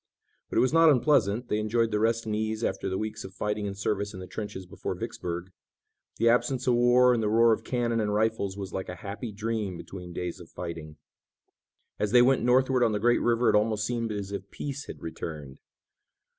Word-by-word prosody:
But - - -3
it - - +6
was 130 +3 +2
not 165 0 +7
unpleasant. 125 -5 +3
They 105 - 0
enjoyed 115 +1 +1
the 105 - +1
rest 115 +1 +1
and 110 -1 -2
ease 110 +1 -2
after 95 - -1
the 95 - -2
weeks 110 0 -4
of 95 0 -10
fighting 105 0 -2
and 100 0 -5
service 100 0 -2
in - - -7
the 90 - -7
trenches 100 -2 -6
before 90 - -5
Vicksburg. 85 +1 -5 0.7
The 115 - +2
absence 125 +2 +2
of 125 - +3
war 120 +1 +5
and 115 - 0
the 105 - +1
roar 115 +1 +5
of - - -3
cannon 120 -2 0
and 105 -1 0
rifles 105 -2 0
was 100 -2 -6
like 95 - -4
a 90 - -5
happy 100 +3 -5
dream 105 -3 -3
between 90 0 -9
days 85 0 -4
of 85 - -12
fighting. 80 -3 -7 1.0
As 105 +1 -1
they 120 -1 +8
went 130 +1 +3
northward 130 +2 +3
on 115 -2 +2
the 105 - 0
great 120 +3 +3
river 120 0 +2
it - - +2
almost 105 0 +2
seemed 115 -1 -2
as 100 -1 -4
if 100 -1 -6
peace 140 -1 -5
had - - -9
returned. 75 -4 -7
110 Hz, 215 wpm, -28 LUFS, 100-120 Hz, 1.0 s, they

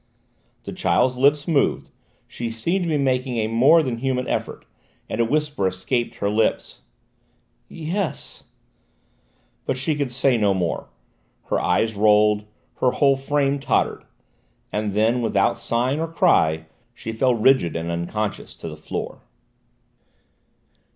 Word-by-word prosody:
The - - -7
child's 130 0 +1
lips 145 +4 +3
moved: 155 -5 +1 0.4
she 120 -1 -5
seemed 170 +12 -1
to - - -2
be 155 - +1
making 130 -2 0
a 110 - +1
more 135 +9 +5
than 120 -4 -3
human 130 0 -1
effort, - - -3 0.4
and - - -2
a - - +3
whisper 150 -5 0
escaped 115 +6 -2
her 100 - -2
lips: 110 +1 -1 0.9
"Yes 170 +3 -4 0.6
" - - -41
But - - 0
she 135 +4 0
could 140 -3 -2
say 130 0 +2
no 100 -3 +2
more: 90 -3 -2 0.6
her - - +2
eyes 110 0 +1
rolled, 105 0 +3 0.3
her 130 - +3
whole 140 -1 +3
frame 140 +1 0
tottered, 135 - 0 0.7
and 105 0 -2
then, 115 +4 +2
without 100 -4 +2
sign 125 +5 -1
or 165 - -1
cry, 80 - +2 0.3
she 115 - -6
fell 125 +2 +2
rigid 115 -7 +3
and 85 +1 -3
unconscious 100 +5 -4
to - - -8
the 75 - -6
floor. 75 - -6
120 Hz, 140 wpm, -22 LUFS, 105-140 Hz, 0.9 s, more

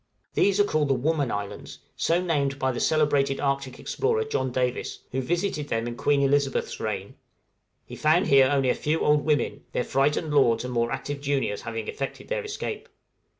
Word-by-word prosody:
These 200 0 +2
are - - +7
called 155 -7 +1
the 135 - +2
Woman 145 +1 0
Islands, 100 -1 -5 0.2
so 170 +1 +1
named 145 -6 0
by 130 -1 0
the 120 - -4
celebrated 145 -3 +2
Arctic 140 -2 -1
explorer 450 +1 0
John 130 - -2
Davis, 125 0 -2
who 130 - -1
visited 170 0 -1
them 115 -2 -1
in 120 0 -4
Queen 140 +3 +2
Elizabeth's 140 0 +1
reign; - - -4 0.7
he - - -9
found 160 +5 +3
here 135 -5 +5
only 135 -2 +2
a - - +4
few 155 +2 -1
old 150 0 +3
women, 150 -1 0
their - - 0
frightened 150 +4 +1
lords 120 -6 +4
and 125 - -4
more 120 0 +1
active 140 +1 -4
juniors 140 -7 -1
having 115 -1 -5
effected 135 -1 -5
their - - -1
escape. 430 +1 -5
140 Hz, 185 wpm, -26 LUFS, 130-155 Hz, 0.7 s, are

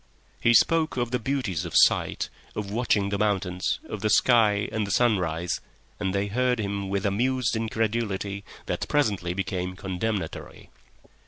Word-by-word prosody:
He 120 0 +4
spoke 160 +2 +3
of 120 -1 -1
the 125 - 0
beauties 125 - -1
of 85 - -6
sight, - - +3 0.3
of 100 -2 -4
watching 105 -3 +1
the 100 0 -2
mountains, 95 -3 0
of - - -6
the 110 - +1
sky 105 -2 +4
and 110 -2 -1
the - - -6
sunrise, 90 -7 +1 0.4
and 95 -2 -1
they 100 +1 0
heard 125 +4 +1
him 100 -2 -3
with 100 +1 -1
amused 120 +4 +1
incredulity 110 -3 -2 0.2
that - - -3
presently 100 - 0
became 90 -1 -3
condemnatory. 95 -1 -4
105 Hz, 150 wpm, -26 LUFS, 95-115 Hz, 0.4 s, He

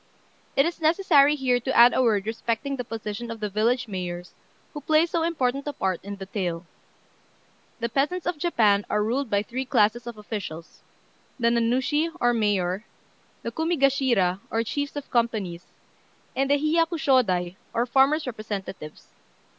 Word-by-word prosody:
It 275 - +4
is 335 0 -3
necessary 310 -3 +4
here 255 -3 +1
to 260 +2 -2
add 240 +1 +8
a - - +2
word 210 -5 +2
respecting 230 +5 -2
the 250 - -4
position 225 0 -6
of 230 -1 -6
the 210 -2 -3
village 230 +5 +1
mayors, 180 -2 -5 0.4
who 295 - -6
play 310 +3 +3
so 335 -1 -1
important 280 -4 -1
a 290 - -2
part 190 -7 -2
in 200 +1 -6
the 195 -1 -8
tale. 180 -4 -3 1.1
The 235 - -1
peasants 290 +9 -1
of 330 - -2
Japan 215 - +3
are 210 0 +1
ruled 250 +4 -1
by 200 0 +1
three 250 +4 -4
classes 240 -2 +1
of 235 -2 -7
officials: 200 -6 -7 0.6
the 235 -1 +3
Nanushi, 255 +7 +1
or 240 0 +3
mayor; 205 -3 0 0.6
the - - -3
Kumigashira, 270 - +1
or 225 0 0
chiefs 285 +6 -3
of 290 -1 -7
companies; 215 -8 -1 0.7
and 270 0 0
the 285 - +5
Hiyakushôdai, 275 - +1 0.2
or 235 +1 0
farmers' 270 +5 +3
representatives. 205 - -6
235 Hz, 155 wpm, -25 LUFS, 205-280 Hz, 1.1 s, add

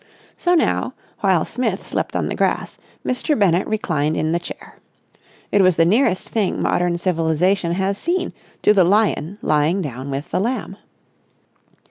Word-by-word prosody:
So 355 0 +1
now, 325 - +1 0.2
while 190 -5 +2
Smith 225 -6 -2
slept - - -3
on - - 0
the - - -2
grass, - - -1 0.3
Mr. 260 +4 0
Bennett 185 -4 +2
reclined 160 -8 -1
in 155 - 0
the 170 - +1
chair. 175 - -10 0.7
It 200 - +4
was 185 -2 +4
the 165 - +4
nearest 195 0 +2
thing 210 -4 0
modern 175 -1 +1
civilisation 170 +1 +1
has 195 +2 -1
seen 355 +2 -1 0.3
to 210 - +6
the 195 -3 +5
lion 200 -2 +1
lying 155 +5 +2
down 135 -5 -5
with 140 +5 -5
the - - +1
lamb. 220 -2 -2
185 Hz, 155 wpm, -20 LUFS, 165-210 Hz, 0.7 s, to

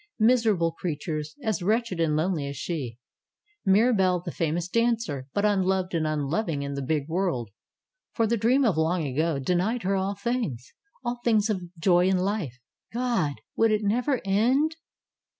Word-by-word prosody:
Miser 225 -1 +4
able 165 -1 0
creatures, 155 -2 -4
as 215 -7 -1
wretched 215 -1 0
and 160 -2 +2
lonely 155 -2 0
as 140 -1 -6
she! 135 -8 -4 0.7
Mira 220 +6 +5
belle, 185 -3 +2
the 170 - -6
famous 165 +1 -1
dancer, 230 - 0
but 205 +6 0
unloved 190 -2 +1
and 160 -2 +1
unloving 155 +1 -1
in 140 0 -4
the 140 - -3
big 145 +1 -1
world! 165 - -1 0.6
For 230 - +2
the 230 +2 +1
Dream 245 +5 +3
of 205 -8 +2
Long 160 +1 +1
Ago 150 +3 0
denied 180 - 0
her 195 +2 +1
all 195 +1 -1
things; 200 - -3 0.3
all 240 0 -2
things 220 -2 +3
of 190 -3 -2 0.2
joy 175 +1 +4
in 190 0 +3
life. 185 - -2 0.3
God! 235 - 0 0.2
Would 225 - +4
it 215 0 +1
never 245 +6 +1
end! 255 +11 +2
185 Hz, 170 wpm, -26 LUFS, 155-220 Hz, 0.7 s, Mira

